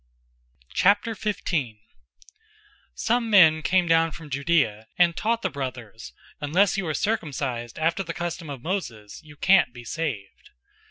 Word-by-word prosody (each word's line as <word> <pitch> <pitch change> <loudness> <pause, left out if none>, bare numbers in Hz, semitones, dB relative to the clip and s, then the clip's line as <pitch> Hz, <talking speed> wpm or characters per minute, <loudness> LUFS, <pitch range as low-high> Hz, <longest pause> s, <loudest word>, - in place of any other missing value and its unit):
015:001 200 - 0 1.2
Some 235 0 0
men 160 -7 +6
came 180 +2 +2
down 165 0 +4
from 150 -1 -11
Judea 135 -7 0
and 175 -1 +4
taught 230 +4 -1
the 190 - +1
brothers, 125 -6 -7 0.3
"Unless 165 +7 +2
you 195 -3 -2
are 155 - -1
circumcised 135 - -2
after 165 +4 0
the 170 -3 -5
custom 170 -2 -5
of 135 -4 -7
Moses, 120 - -5
you 155 -2 -15
can't 190 -1 +4
be 120 -1 -11
saved." 120 -11 -5
160 Hz, 130 wpm, -25 LUFS, 130-190 Hz, 1.2 s, men